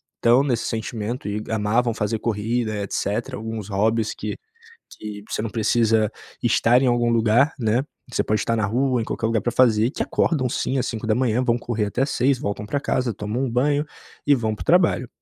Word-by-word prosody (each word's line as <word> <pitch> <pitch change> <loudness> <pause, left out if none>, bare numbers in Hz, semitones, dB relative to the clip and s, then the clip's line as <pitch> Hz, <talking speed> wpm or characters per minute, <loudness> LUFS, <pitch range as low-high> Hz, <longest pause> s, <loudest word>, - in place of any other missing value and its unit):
estão 120 +3 +4
nesse 120 -5 0
sentimento 115 0 -4
e 105 +1 -2
amavam 110 +2 +1
fazer 110 0 -1
corrida, 110 +1 -1
etcétera, 115 +6 -2
alguns 110 -2 -6
hobbies 110 +2 +1
que - - -5 0.6
que 105 -1 -7
você - - -2
não 110 0 -3
precisa 110 -1 +2 0.3
estar 120 +1 +4
em - - +2
algum 120 -1 +2
lugar, 115 +6 +3
né. 115 +4 +1 0.3
Você - - 0
pode 105 0 0
estar 115 - 0
na 110 -2 +1
rua, 125 +3 +1
em - - -2
qualquer 110 - -2
lugar 115 -1 +1
pra 120 +4 -2
fazer, 115 -4 +4
e - - -1
que - - -3
acordam 130 -7 +1
sim 130 +3 -1
à - - +2
5h, 115 +2 0
vão 120 -1 +2
correr 120 -3 -2
até 120 +6 0
6h, 135 -1 +1
voltam 100 0 -3
pra 140 +6 -1
casa, 125 -5 -1
tomam 105 +6 -2
um 130 - -1
banho 145 +5 +1 0.4
e 145 - +6
vão 110 -4 -1
para 105 - -6
o - - -9
trabalho. 165 -8 +3
115 Hz, 200 wpm, -23 LUFS, 110-125 Hz, 0.6 s, e